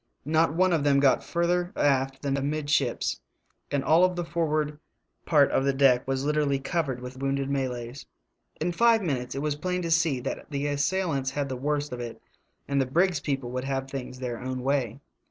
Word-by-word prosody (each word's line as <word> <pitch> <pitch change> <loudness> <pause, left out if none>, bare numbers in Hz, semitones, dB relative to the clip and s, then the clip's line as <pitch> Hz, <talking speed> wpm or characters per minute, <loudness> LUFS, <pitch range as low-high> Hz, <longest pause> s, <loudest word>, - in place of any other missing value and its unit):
Not 160 +1 +2
one 185 +1 +3
of 160 -4 +1
them 140 -1 +4
got 140 -1 +3
further 175 +1 0
aft 135 -1 +1
than 140 -1 0
amidships, 145 - 0 0.5
and 140 -1 0
all 175 +4 +5
the 175 -1 -4
forward 155 -3 -1 0.5
part 145 -4 +5
of 135 - +2
the 140 0 +2
deck 135 -2 +4
was 135 0 -1
literally 150 -2 +1
cov 160 +3 -1
ered 130 -2 -3
with 125 +1 -8
wounded 135 0 -1
Malays. 130 -1 -3 0.5
In 175 - 0
five 230 +3 +4
minutes 130 -6 -2
it 135 - -3
was 150 -1 0
plain 180 +4 -2
to 165 - -2
see 165 -5 +2
that - - -5
the 140 -1 -2
assailants 145 -1 0
had 140 0 -3
the 130 - -3
worst 145 +1 -2
of 125 - -5
it 120 -1 -6 0.5
and 140 -1 +1
the 130 - 0
brig's 175 +4 +2
people 135 -4 -3
would 130 +1 -3
have 135 -1 -2
things 130 -2 -6
their 125 -2 -4
own 130 0 -4
way. 135 -3 0
140 Hz, 195 wpm, -27 LUFS, 135-160 Hz, 0.5 s, all